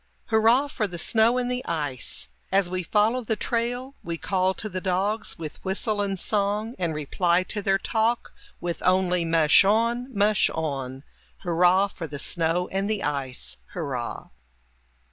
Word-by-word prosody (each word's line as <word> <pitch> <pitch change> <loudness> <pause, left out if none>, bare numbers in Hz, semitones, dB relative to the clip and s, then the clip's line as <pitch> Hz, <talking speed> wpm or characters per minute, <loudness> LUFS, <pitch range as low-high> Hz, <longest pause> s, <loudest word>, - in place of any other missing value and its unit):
Hurrah 225 +5 +4
for 225 -6 -2
the 175 -2 -7
snow 225 +7 +3
and 250 0 -1
the 250 0 -2
ice! 145 -6 -2 0.2
As 190 -2 +2
we 185 0 -1
follow 215 +7 +1
the 220 0 -1
trail, 245 +4 -2
We 170 0 -3
call 190 +1 0
to 215 - -4
the 185 -3 -4
dogs 195 +4 -1
with 160 -3 -8
whistle 205 +2 0
and 195 -1 -1
song, 210 +3 0
And 170 -3 -1
reply 170 +4 +1
to 205 +3 -4
their 195 -1 +2
talk 225 +4 0 0.3
With 175 -1 -4
only 180 -1 +2
"mush 165 0 +5
on, 230 +5 +2
mush 210 -2 +3
on"! 135 -4 -3 0.4
Hurrah 180 +2 +4
for 175 -3 -7
the 145 -1 -6
snow 165 +4 0
and 195 +2 -1
the 215 -2 -1
ice! 135 -3 -2 0.2
Hurrah! 135 -9 -4
190 Hz, 160 wpm, -25 LUFS, 165-220 Hz, 0.4 s, mush